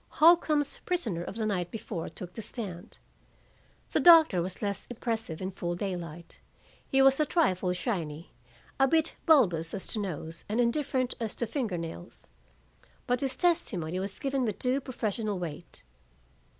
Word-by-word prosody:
Holcombe's 310 Hz, -3 st, +4 dB
prisoner 235 Hz, -, -1 dB
of 195 Hz, -, -7 dB
the 220 Hz, -1 st, -1 dB
night 180 Hz, -5 st, -1 dB
before 200 Hz, -5 st, -5 dB
took 180 Hz, -1 st, -9 dB
the 225 Hz, -, -6 dB
stand. 195 Hz, -5 st, -7 dB, 0.9 s
The -, -, +3 dB
doctor 325 Hz, -, +7 dB
was 185 Hz, +4 st, -5 dB
less 200 Hz, -1 st, -3 dB
impressive 225 Hz, -8 st, -3 dB
in 190 Hz, -, -3 dB
full 175 Hz, -2 st, -3 dB
daylight; 175 Hz, -3 st, -5 dB, 0.5 s
he 270 Hz, 0 st, +4 dB
was 270 Hz, +1 st, +5 dB
a 305 Hz, -, +4 dB
trifle 185 Hz, -, +2 dB
shiny, 170 Hz, -, -4 dB, 0.5 s
a 270 Hz, -, +5 dB
bit 320 Hz, +3 st, +2 dB
bulbous 180 Hz, -, +4 dB
as 195 Hz, -, -4 dB
to 220 Hz, -, -2 dB
nose 165 Hz, -4 st, -5 dB
and 220 Hz, +3 st, 0 dB
indifferent 255 Hz, +1 st, +1 dB
as 225 Hz, -3 st, -3 dB
to 235 Hz, -, 0 dB
finger 225 Hz, -6 st, -2 dB
nails. 165 Hz, +1 st, -8 dB, 0.8 s
But 245 Hz, 0 st, 0 dB
his 265 Hz, -2 st, -2 dB
testimony 185 Hz, -, 0 dB
was 195 Hz, +1 st, -3 dB
given 270 Hz, -1 st, -1 dB
with 215 Hz, -5 st, -1 dB
due 260 Hz, +2 st, 0 dB
professional 215 Hz, -5 st, -2 dB
weight. 170 Hz, -1 st, -7 dB
215 Hz, 155 wpm, -29 LUFS, 175-265 Hz, 0.9 s, doctor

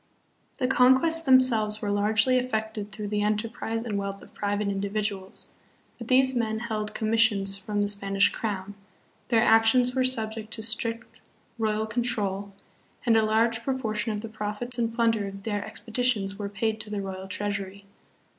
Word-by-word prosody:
The 260 Hz, -, 0 dB
conquests 265 Hz, +6 st, +4 dB
themselves 250 Hz, -7 st, +4 dB
were 205 Hz, -1 st, -2 dB
largely 220 Hz, +5 st, +3 dB
effected 220 Hz, -4 st, -3 dB
through 205 Hz, +1 st, -5 dB
the 210 Hz, 0 st, 0 dB
enterprise 225 Hz, +2 st, -1 dB
and 210 Hz, -4 st, -2 dB
wealth 200 Hz, 0 st, -4 dB
of -, -, -17 dB
private 205 Hz, 0 st, -1 dB
individuals; 200 Hz, -1 st, -3 dB, 0.5 s
but 235 Hz, -, -7 dB
these 260 Hz, +1 st, +4 dB
men 225 Hz, -3 st, 0 dB
held 215 Hz, -2 st, -4 dB
commissions 215 Hz, -3 st, +2 dB
from 205 Hz, +1 st, -2 dB
the -, -, 0 dB
Spanish 200 Hz, -1 st, +2 dB
crown, 205 Hz, -2 st, -4 dB, 0.5 s
their 230 Hz, -2 st, +3 dB
actions 225 Hz, +3 st, +4 dB
were 260 Hz, 0 st, +2 dB
subject 220 Hz, -3 st, -1 dB
to 220 Hz, -, -3 dB
strict 230 Hz, +1 st, -2 dB, 0.4 s
royal 215 Hz, 0 st, 0 dB
control, 210 Hz, -4 st, -2 dB, 0.5 s
and 230 Hz, -2 st, +4 dB
a 220 Hz, -, +5 dB
large 225 Hz, +1 st, +2 dB
proportion 230 Hz, -4 st, -2 dB
of 210 Hz, -1 st, -3 dB
the 225 Hz, -, -6 dB
profits 215 Hz, +3 st, -4 dB
and 230 Hz, -1 st, 0 dB
plunder 225 Hz, -3 st, +1 dB
of 195 Hz, 0 st, -9 dB
their 205 Hz, -2 st, -2 dB
expeditions 225 Hz, -4 st, -1 dB
were 200 Hz, -1 st, -3 dB
paid 220 Hz, +2 st, -1 dB
to -, -, -8 dB
the 205 Hz, -1 st, -3 dB
royal 190 Hz, 0 st, -6 dB
treasury. 200 Hz, 0 st, -4 dB
215 Hz, 160 wpm, -26 LUFS, 205-230 Hz, 0.5 s, a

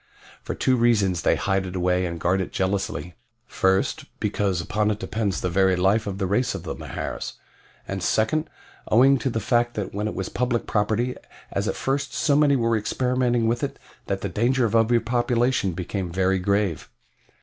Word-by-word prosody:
"For -, -, -5 dB
two 130 Hz, -1 st, +2 dB
reasons 105 Hz, -7 st, +2 dB
they -, -, +3 dB
hide 95 Hz, -1 st, 0 dB
it 90 Hz, -, -7 dB
away 90 Hz, 0 st, +1 dB
and 85 Hz, -1 st, -5 dB
guard 90 Hz, +3 st, +1 dB
it 95 Hz, -, -4 dB
jealously. 95 Hz, -4 st, -2 dB, 0.3 s
First, 95 Hz, 0 st, 0 dB
because 100 Hz, -3 st, 0 dB
upon 105 Hz, +5 st, 0 dB
it 105 Hz, -, 0 dB
depends 105 Hz, -3 st, -2 dB
the -, -, 0 dB
very 95 Hz, +1 st, +3 dB
life 100 Hz, +4 st, +2 dB
of 95 Hz, -1 st, -3 dB
the 95 Hz, -, -1 dB
race 105 Hz, +5 st, 0 dB
of 95 Hz, -, -6 dB
Mahars, -, -, -5 dB, 0.5 s
and 95 Hz, 0 st, -4 dB
second, 130 Hz, -, +1 dB, 0.4 s
owing 130 Hz, +4 st, +5 dB
to 135 Hz, -, -1 dB
the 115 Hz, -, -1 dB
fact 120 Hz, +2 st, +1 dB
that 105 Hz, -3 st, -4 dB
when 105 Hz, +2 st, -2 dB
it -, -, -4 dB
was 95 Hz, -, -3 dB
public 120 Hz, -1 st, -1 dB
property 110 Hz, +4 st, 0 dB, 0.4 s
as 100 Hz, +2 st, -1 dB
at -, -, -1 dB
first 135 Hz, -1 st, -2 dB
so 145 Hz, -3 st, +2 dB
many 145 Hz, -1 st, +4 dB
were 115 Hz, -2 st, +2 dB
experimenting 125 Hz, +2 st, 0 dB
with 120 Hz, +1 st, 0 dB
it -, -, -3 dB, 0.3 s
that -, -, -2 dB
the -, -, -2 dB
danger 125 Hz, +3 st, +1 dB
of 115 Hz, -, 0 dB
over 115 Hz, +1 st, +4 dB
population 120 Hz, -3 st, +1 dB
became 90 Hz, +1 st, -4 dB
very 95 Hz, +1 st, +1 dB
grave. 100 Hz, -3 st, 0 dB
105 Hz, 185 wpm, -24 LUFS, 95-120 Hz, 0.5 s, owing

